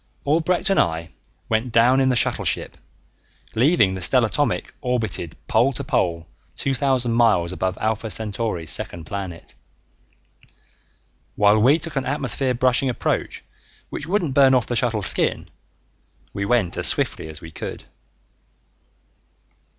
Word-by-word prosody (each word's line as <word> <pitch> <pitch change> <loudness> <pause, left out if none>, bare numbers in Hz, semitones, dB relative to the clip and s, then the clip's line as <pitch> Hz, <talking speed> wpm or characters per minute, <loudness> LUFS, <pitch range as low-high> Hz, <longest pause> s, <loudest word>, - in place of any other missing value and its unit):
Albrecht 165 +6 +1
and 195 - +3
I 85 0 0 0.4
went 115 +2 -1
down 125 +4 +4
in 130 -1 +3
a - - +1
shuttleship, - - -1 0.8
leaving 120 - +3
the 95 - -5
stellatomic 85 - +1
orbited 110 -9 -2
pole 120 +5 +2
to - - -5
pole 85 -2 -1 0.3
two 135 - -1
thousand 130 -3 +1
miles 110 -7 +2
above 95 0 -2
Alpha 110 +1 -2
Centauri's 105 -6 -3
second 85 -2 -2
planet. 95 -1 -7 1.8
While 105 +1 +4
we 130 +8 +5
took 160 -2 -5
an 135 - -1
atmosphere 135 -2 0
brushing 130 +2 +2
approach 125 - -2 0.5
which 145 - -6
wouldn't 175 -6 0
burn 135 -1 +5
off 125 - +2
the 120 - -3
shuttle's 115 -5 0
skin, - - 0 0.8
we 100 - -3
went 105 -6 +1
as - - +4
swiftly - - +1
as 80 -1 -7
we 80 - -11
could. - - -7
115 Hz, 135 wpm, -22 LUFS, 95-130 Hz, 1.8 s, we